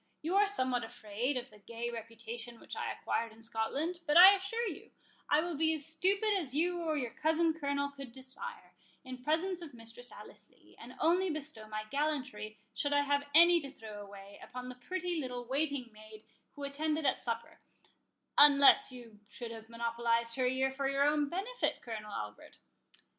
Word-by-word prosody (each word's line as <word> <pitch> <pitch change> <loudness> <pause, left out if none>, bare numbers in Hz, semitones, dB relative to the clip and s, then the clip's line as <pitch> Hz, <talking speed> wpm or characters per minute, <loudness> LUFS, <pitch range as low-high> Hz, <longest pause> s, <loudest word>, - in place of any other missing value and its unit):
You 340 +5 -1
are 410 +1 +5
somewhat 255 -11 0
afraid 230 +6 -3
of 250 +1 -6
the 210 - -16
gay 235 +3 -5
reputation 230 +1 -7
which - - -8
I - - -2
acquired 230 0 -2
in 225 +1 -15
Scotland; 275 +10 -1
but 295 +2 +5
I 375 +3 +12
assure 405 +5 -2
you, 340 - -7 0.4
I 295 - +5
will 345 +1 -3
be 320 +2 +2
as 295 -2 -5
stupid 385 +7 +1
as 275 -6 -4
you 345 +3 +1
or 315 -2 0
your 250 -5 -2
cousin 320 +1 +2
Colonel 280 -2 -1
could 275 -3 -9
desire, 265 - -6 0.3
in 255 -1 -9
presence 350 +5 0
of 305 -7 -9
Mistress 230 +2 -8
Alice - - -13
Lee, - - -23
and - - -11
only 360 +4 +3
bestow 300 -8 -6
my 215 0 -4
gallantry, 260 -8 -2 0.2
should 285 +4 0
I 285 - +4
have 285 0 0
any 340 +1 +8
to 280 -3 -7
throw 220 -6 -9
away, 200 0 -11
upon 250 0 -7
the - - -6
pretty 360 -2 -2
little 250 -3 -4
waiting 275 -2 -1
maid 215 0 -13 0.3
who 285 - -8
attended 305 +2 -1
at 265 - +2
supper—unless 280 +4 +3
you 235 -4 -12
should 235 -2 -6
have 225 -1 -10
monopolized 230 0 0
her 255 -1 +1
ear 265 +1 +1
for 270 0 -2
your 275 0 +2
own 295 0 +2
benefit, 410 +9 -2
Colonel 215 -3 -6
Albert?" 105 - -7
275 Hz, 180 wpm, -33 LUFS, 230-315 Hz, 0.4 s, I